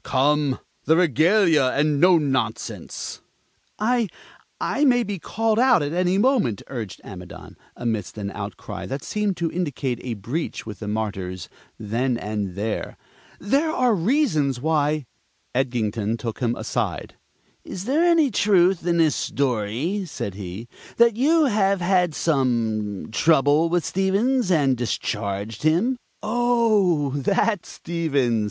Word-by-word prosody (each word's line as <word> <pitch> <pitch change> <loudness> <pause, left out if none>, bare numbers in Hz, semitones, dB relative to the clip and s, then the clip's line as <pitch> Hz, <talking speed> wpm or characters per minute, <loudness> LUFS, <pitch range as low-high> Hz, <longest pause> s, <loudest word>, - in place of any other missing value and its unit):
"Come, 140 0 +1 0.3
the 160 +3 +4
regalia, 170 - +4
and 145 0 +2
no 180 +2 +6
nonsense!" 140 -4 -3 0.6
"I 235 +1 +1 0.5
I 290 - 0
may 245 -4 +4
be 200 -3 -4
called 225 +5 0
out 250 - +4
at 145 +2 -3
any 180 +1 +1
moment," 210 - +2
urged 115 -8 -6
Amidon, 90 -3 -10 0.2
amidst 110 -3 -3
an 100 -1 -4
outcry 100 -1 -7
that 135 +1 -5
seemed 210 -3 -1
to 170 -1 -1
indicate 140 -8 -2
a 120 -3 -4
breach 120 - -4
with 110 -2 -8
the 105 - -6
Martyrs 100 -4 -4 0.3
then 120 +4 -1
and 105 -4 -4
there. 105 +2 -3 0.4
"There 275 - +1
are 255 -6 +2
reasons 170 - +1
why 150 0 0 0.2
" - - -44
Edgington 115 -4 -1
took 115 -1 -5
him 120 -2 0
aside. - - -3 0.5
"Is 185 +1 -7
there 290 +7 +2
any 335 -6 +4
truth 190 -3 +3
in 170 -1 +2
this 160 -3 +3
story," 135 - -1
said 100 - -5
he, 95 +3 -7 0.3
"that 235 -2 +5
you 305 +6 +3
have 200 -5 +2
had 180 -3 +2
some 115 - 0
trouble 155 +4 +3
with 175 -1 0
Stevens, 200 +5 +1
and 145 -7 +3
discharged 105 -3 -3
him?" 175 - +2 0.3
"Oh, 215 - +2
that 175 - 0
Stevens!" 145 -9 -1
155 Hz, 135 wpm, -23 LUFS, -, 0.6 s, no